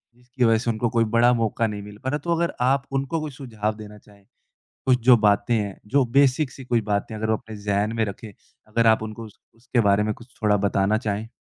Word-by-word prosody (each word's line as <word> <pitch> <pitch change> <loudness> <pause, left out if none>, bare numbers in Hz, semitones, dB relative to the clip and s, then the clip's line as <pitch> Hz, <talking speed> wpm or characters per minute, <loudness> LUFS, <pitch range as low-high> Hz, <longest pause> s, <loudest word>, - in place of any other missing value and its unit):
जिसकी 125 +1 -4
वज़ह 115 -1 +4
से 120 +2 -2
उनको 115 +1 -1
कोई 115 +1 +2
बड़ा 120 +1 +5
मौका 115 -1 0
नहीं 105 -1 -5
मिल 105 0 -11
पा 130 - -1
रहा 145 - -1
है। - - -2
तो 170 -1 +1
अगर 170 0 -1
आप 135 +2 +2
उनको 135 +4 -1
कोई 155 -2 -5
सुझाव 110 -6 -4
देना 105 -1 -11
चाहें, 100 -1 -21 0.6
कुछ 130 -1 +3
जो 125 -2 +8
बातें 105 +2 +2
हैं, 100 -3 -2
जो 135 +4 +2
बेसिक 140 0 +3
सी 135 - -11
कोई 120 -2 +1
बातें 100 +2 -1
अगर 110 +1 -3
वो 110 - +2
अपने 110 -1 -11
ज़ेहन 105 +1 -1
में 115 - +1
रखें, 105 +2 -8 0.4
अगर 115 +1 +1
आप 110 0 +4
उनको 110 +1 -7
उस 105 - -16 0.2
उसके 120 +1 -2
बारे 100 +1 +3
में 110 0 -1
कुछ 120 +4 -17
थोड़ा 105 -1 +3
बताना 100 +1 +1
चाहें? 110 -1 -3
110 Hz, 240 wpm, -23 LUFS, 105-125 Hz, 0.6 s, जो